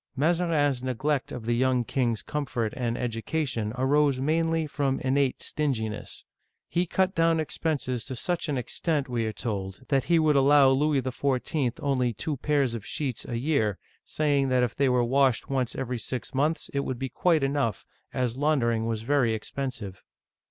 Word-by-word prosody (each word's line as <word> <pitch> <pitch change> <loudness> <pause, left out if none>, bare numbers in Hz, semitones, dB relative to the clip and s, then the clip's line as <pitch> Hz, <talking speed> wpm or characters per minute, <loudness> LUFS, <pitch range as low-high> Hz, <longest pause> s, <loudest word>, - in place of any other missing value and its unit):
Mazarin*s 150 -3 +1
neglect 130 +2 -1
of 120 -3 -6
the 120 - +1
young 125 0 +2
king's 120 -3 -1
comfort 125 -7 -2
and 120 -2 -1
education 120 -1 -2
arose 140 +1 +3
mainly 165 +3 +1
from 140 -2 -1
innate 135 0 +1
stinginess. 110 -8 -2 0.4
He 175 +1 0
cut 190 +2 +1
down 165 -1 +3
expenses 140 -6 -2
to 130 - -5
such 175 +5 -1
an 140 - 0
extent, 145 +3 -1
we 120 -3 -1
are - - -1
told, 100 -3 -4
that 135 -3 +2
he 170 - +3
would 155 -2 +3
allow 140 0 +6
Louis 140 0 +2
XIV. 130 0 -1
only 130 -4 +1
two 145 +8 -3
pairs 140 -3 +1
of 115 -3 -5
sheets 130 0 -3
a 120 - -2
year, 115 - +1 0.3
saying 145 -3 +1
that 130 -1 +3
if 120 - 0
they 140 -1 +2
were 125 -1 +3
washed 130 0 +2
once 130 -3 -1
every 125 -2 -3
six 130 +2 -4
months 150 +4 0
it 140 - 0
would 130 -2 -2
be 135 - -3
quite 165 +2 +2
enough, 135 -7 0 0.3
as 125 -2 -1
laundering 120 -6 +1
was 110 -1 -2
very 125 -3 +2
expensive! 110 -4 -5
135 Hz, 170 wpm, -27 LUFS, 120-150 Hz, 0.4 s, allow